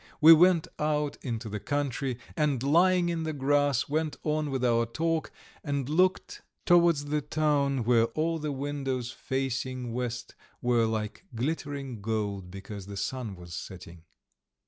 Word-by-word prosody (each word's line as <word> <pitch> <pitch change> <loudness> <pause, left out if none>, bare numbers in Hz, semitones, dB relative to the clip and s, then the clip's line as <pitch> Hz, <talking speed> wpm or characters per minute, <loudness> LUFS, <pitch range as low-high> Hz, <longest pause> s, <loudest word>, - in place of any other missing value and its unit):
We 160 +2 +10
went 170 0 +5
out 150 -1 0
into 115 -3 -4
the 105 0 -4
country, 135 +1 -2 0.2
and 150 -6 +1
lying 175 +4 +4
in 170 -1 -1
the 160 -1 -2
grass 145 -1 +2
went 155 +1 -1
on 155 -1 0
with 130 -2 -1
our 115 -1 +2
talk, 165 +6 -1 0.3
and 140 -4 -2
looked 180 +5 +1 0.2
towards 170 -4 +4
the 150 +1 0
town 140 -4 +1
where 115 0 +4
all 165 +1 +1
the 150 -1 -3
windows 135 -3 -3
facing 130 -2 -3
west 120 0 -4 0.3
were 120 -2 +2
like 110 - -3
glittering 140 -2 -3
gold 100 -3 -2
because 100 +1 -8
the 100 -1 -7
sun 110 0 -3
was 85 -1 -11
setting. 85 -2 -8
135 Hz, 145 wpm, -28 LUFS, 115-150 Hz, 0.3 s, We